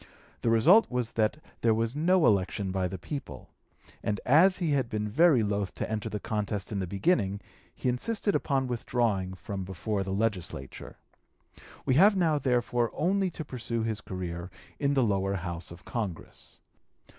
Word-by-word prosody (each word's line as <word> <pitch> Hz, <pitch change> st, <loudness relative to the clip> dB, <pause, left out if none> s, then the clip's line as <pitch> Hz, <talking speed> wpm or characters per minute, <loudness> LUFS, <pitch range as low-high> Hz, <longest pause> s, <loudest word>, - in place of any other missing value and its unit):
The 115 Hz, -, +1 dB
result 165 Hz, -, +6 dB
was 125 Hz, -2 st, -1 dB
that 110 Hz, +5 st, +1 dB, 0.2 s
there 115 Hz, -2 st, +3 dB
was 115 Hz, +3 st, -1 dB
no 175 Hz, +2 st, +3 dB
election 100 Hz, -2 st, +1 dB
by 95 Hz, -1 st, 0 dB
the 95 Hz, +1 st, -5 dB
people; 140 Hz, -, -7 dB, 0.5 s
and 105 Hz, -2 st, -1 dB
as 175 Hz, +8 st, +5 dB
he 170 Hz, -5 st, 0 dB
had 135 Hz, -4 st, +1 dB
been 105 Hz, 0 st, -2 dB
very 140 Hz, +1 st, +4 dB
loath 100 Hz, -2 st, -2 dB
to -, -, -3 dB
enter 110 Hz, 0 st, -3 dB
the 105 Hz, 0 st, -4 dB
contest 105 Hz, -2 st, -3 dB
in 100 Hz, -, -2 dB
the 95 Hz, -, -2 dB
beginning, 100 Hz, -, +1 dB, 0.4 s
he -, -, -3 dB
insisted 205 Hz, -, 0 dB
upon 135 Hz, -3 st, +1 dB
withdrawing 115 Hz, -6 st, -1 dB
from 95 Hz, +1 st, -5 dB
before 95 Hz, +3 st, -3 dB
the 95 Hz, 0 st, -3 dB
legislature. 95 Hz, -10 st, -3 dB, 0.9 s
We -, -, +2 dB
have 205 Hz, +1 st, +7 dB
now 160 Hz, -5 st, +2 dB
therefore 120 Hz, -2 st, +1 dB
only 190 Hz, +3 st, +1 dB
to 160 Hz, -2 st, -7 dB
pursue 120 Hz, -3 st, -3 dB
his 110 Hz, -1 st, -2 dB
career 90 Hz, -1 st, -5 dB, 0.3 s
in 140 Hz, -1 st, +1 dB
the 135 Hz, -, +4 dB
lower 100 Hz, -2 st, +1 dB
house 85 Hz, -2 st, -4 dB
of 85 Hz, +2 st, -11 dB
Congress. 105 Hz, -8 st, -6 dB
110 Hz, 170 wpm, -29 LUFS, 95-140 Hz, 0.9 s, have